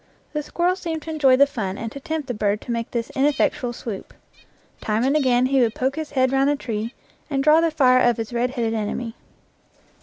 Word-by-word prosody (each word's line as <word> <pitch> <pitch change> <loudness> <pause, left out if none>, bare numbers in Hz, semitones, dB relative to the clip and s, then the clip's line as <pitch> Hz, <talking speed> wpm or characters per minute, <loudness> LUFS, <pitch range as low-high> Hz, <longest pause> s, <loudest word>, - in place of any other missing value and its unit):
The 300 - -1
squirrel 350 +4 0
seemed 325 -4 -4
to 320 - -6
enjoy 280 -5 +4
the 280 +2 +6
fun 210 -9 -4
and 225 -1 -5
to 280 - -8
tempt 310 0 -4
the 245 - -2
bird 210 -1 0
to - - -6
make 230 -1 -2
this 235 0 -3
ineffectual 280 -2 +1
swoop. 225 -4 -7 0.7
Time 215 +2 0
and 270 +3 +2
again 255 -4 +3
he 265 0 +2
would 230 -2 +1
poke 265 +2 -1
his 315 -1 -4
head 260 -2 +2
round 270 +1 +3
the 290 - +2
tree 230 -3 -4 0.3
and 275 -2 0
draw 305 +2 +6
the 335 - +2
fire 260 -5 +4
of 240 -2 +3
his 225 +1 -5
red 240 +1 +1
headed 235 -3 -2
enemy. 225 +2 -3
255 Hz, 220 wpm, -22 LUFS, 230-290 Hz, 0.7 s, the